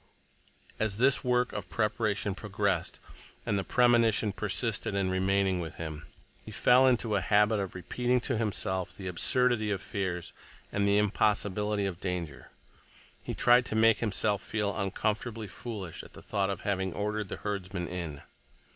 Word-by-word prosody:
As 110 -2 0
this 130 +3 +3
work 125 -1 +1
of 100 -4 -5
preparation 105 -2 0
progressed, 100 0 -2 0.5
and 100 - +1
the - - -2
premonition 115 -3 +3
persisted 105 +1 -1
in 95 -1 0
remaining 95 0 +1
with 80 -2 -5
him, 80 -3 -6 0.4
he - - -10
fell 130 +2 +5
into 115 -4 +2
a 100 - +2
habit 105 +2 +3
of 95 -2 -4
repeating 125 +8 0
to - - -1
himself 95 -4 -1
the 95 - -7
absurdity 120 +4 +1
of 100 -2 -1
fears 95 -3 -3 0.4
and 100 0 +1
the 100 0 +4
impossibility 105 0 +1
of 95 -2 -4
danger. 85 -6 -4 0.7
He - - -5
tried 125 +1 +5
to - - -3
make 110 -1 +5
himself 105 -2 0
feel 105 -2 -2
uncomfortably 110 +3 -2
foolish 100 -4 -7
at - - -15
the - - -12
thought 100 -2 -1
of 100 - -3
having 95 -2 -1
ordered 105 -1 -2
the - - -5
herdsmen 95 -3 -4
in. 85 -5 -6
105 Hz, 155 wpm, -29 LUFS, 95-110 Hz, 0.7 s, fell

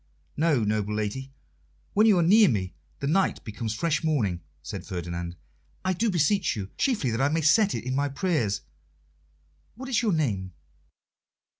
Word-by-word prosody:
"No, 150 -6 +2
noble 105 0 -1
lady; 110 +6 -3 0.6
when 215 +2 +5
you 205 -4 +5
are 175 - +4
near 205 +4 +6
me 95 -6 -1 0.3
the - - -2
night 185 +7 +1
becomes 110 0 -4
fresh 165 +6 0
morning," 110 - 0 0.2
said 90 +4 -6
Ferdinand. 85 -2 -5 0.5
"I 185 - +2
do 220 +6 0
beseech 185 +2 +2
you 100 -2 -6
chiefly 215 - 0
that 115 +3 -1
I 140 - +3
may 160 +2 0
set 195 +7 +4
it 115 - -4
in 130 +1 -3
my 140 +2 0
prayers 140 - 0 1.1
what 260 +3 -8
is 245 - +2
your 220 -5 +1
name?" 100 - -1
140 Hz, 165 wpm, -26 LUFS, -, 1.1 s, near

